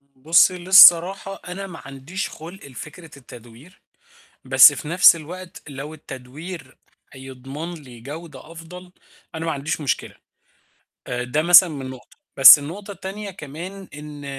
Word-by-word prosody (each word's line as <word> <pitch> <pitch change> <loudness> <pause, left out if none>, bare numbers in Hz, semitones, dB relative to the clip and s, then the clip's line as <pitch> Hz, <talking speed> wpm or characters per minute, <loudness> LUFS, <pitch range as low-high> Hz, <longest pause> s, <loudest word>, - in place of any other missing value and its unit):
بُصي 170 +7 +2
للصراحة 185 +1 +5
أنا 195 +2 -8
ما 165 -6 -12
عنديش 140 +8 -7
خُلق 170 +5 -13
لفكرة 155 +4 -13
التدوير، 120 - -17 0.6
بس - - +6
في 150 - -9
نَفْس 175 +1 +5
الوقت 175 +3 -12
لو 145 +2 -9
التدوير 145 +2 -12 0.4
هيضمن 135 +5 -10
لي 130 -7 -15
جودة 150 +2 -12
أفضل، 180 +2 -13 0.4
أنا 160 0 -6
ما 160 - -2
عنديش 145 +3 -5
مشكلة، 140 -4 -4 0.9
آآ، 125 0 -5
ده 125 +5 -2
مثلًا 175 +2 +6
من 135 -4 -8
نقطة، 130 -2 -15 0.2
بس 135 +2 +9
النقطة 190 +8 -10
التانية 200 +1 -9
كمان 180 +5 -11
إن 150 -1 -11
160 Hz, 135 wpm, -20 LUFS, 135-180 Hz, 0.9 s, بس